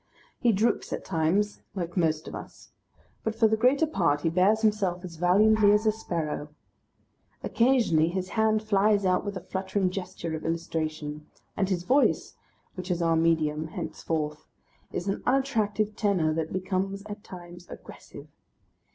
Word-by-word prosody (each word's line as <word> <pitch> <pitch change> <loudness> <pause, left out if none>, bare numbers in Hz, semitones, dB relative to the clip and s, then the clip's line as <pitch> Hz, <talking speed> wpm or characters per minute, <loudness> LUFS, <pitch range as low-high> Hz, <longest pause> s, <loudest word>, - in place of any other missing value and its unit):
He 240 - +3
droops 220 +3 0
at - - -4
times 190 +5 0
like 175 -2 -4
most 160 -3 0
of - - -7
us, - - -10 0.5
but 220 0 -2
for 225 0 +4
the 220 - +2
greater 255 +7 +3
part 170 - +1
he 165 - 0
bears 195 +5 +3
himself 195 -4 +1
as 165 -2 -9
valiantly 205 +4 +4
as 210 +1 +2
a 215 - +5
sparrow. 165 -8 -4 1.0
Occasionally 230 -11 +3
his 185 +1 -3
hand 220 -1 +1
flies 205 -1 +2
out 185 -1 +2
with 200 -1 -4
a - - -7
fluttering 190 0 -1
gesture 180 -3 -5
of 155 - -7
illustration. 155 -2 -3 0.3
And 195 -2 0
his 180 -3 -1
Voice 270 +8 +2 0.4
(which 180 -1 -7
is 175 -1 0
our 165 -1 +3
medium 160 -2 +1
henceforth) 155 -1 -4 0.4
is 180 - -4
an 195 - -1
unattractive 215 -6 +1
tenor 185 -8 +1
that 160 0 -2
becomes 190 +1 -2
at 210 -1 -8
times 175 -1 -11
aggressive. - - -11
185 Hz, 155 wpm, -27 LUFS, 165-215 Hz, 1.0 s, a